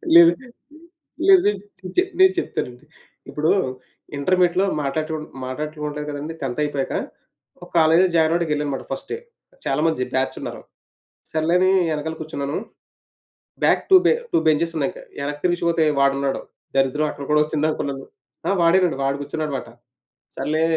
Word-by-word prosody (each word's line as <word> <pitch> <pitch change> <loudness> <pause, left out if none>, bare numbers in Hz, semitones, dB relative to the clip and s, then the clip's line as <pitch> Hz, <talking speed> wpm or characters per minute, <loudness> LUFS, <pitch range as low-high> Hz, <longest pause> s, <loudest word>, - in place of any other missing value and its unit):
లేదు. 340 0 +10 1.0
లేదు. 380 - +7 0.5
చె - - +7 0.2
నేను 375 0 +7
చెప్తానండి. 125 - -5 0.4
ఇప్పుడు 155 +2 +1 0.7
ఇంటర్మీడియేట్‌లో 180 +5 +2 0.2
మాట్లాడుటు 155 +3 -2 0.3
మాట్లాడటం 150 +4 -5
ఉండదు 150 0 -4
కదండీ! 150 +2 -5
10థ్ 135 +1 -2
అయిపోయాక 145 -2 -2 0.7
ఒక - - -12
కాలేజ్‌లో 165 +3 +5
జాయిన్ 160 -1 +4
అవ్వడానికి 170 -2 0
వెళ్ళానన్నమాట 145 -2 -2
ఫస్ట్ 135 - -5
డే. - - -2 0.5
చాలా 135 - 0
మంది 160 -6 0
బ్యాచ్ 130 0 0
ఉన్నారు. - - -6 0.7
సర్లే 160 +2 +1
అని 185 +1 +4 0.2
వెనకాల 155 +1 -3
కూర్చున్నాను. 145 -2 -3 1.1
బ్యాక్ - - +4
2 380 - +9
బె - - +6 0.2
2 340 - +4
బెంచెస్ 165 +2 +2
ఉన్నాయి 140 -3 0
ఇంకా - - -12 0.2
వెనక్కి 145 +1 -4
తిరిగి 175 -1 +1
చూస్తే 170 -1 +2 0.2
వాడున్నాడు. 140 0 +1 0.4
దరిద్రం 135 +3 +2
అక్కడ 140 - -7
కూడా 150 0 +4
వచ్చిందనుకున్నాను. 150 -3 -2 0.4
ఆ! - - +2
వాడేనండి 170 -2 +3
వాడు 135 +1 0
కూర్చున్నాడన్నమాట. 145 -1 -4 0.7
సర్లే 155 +1 0
155 Hz, 140 wpm, -22 LUFS, 140-165 Hz, 1.1 s, లేదు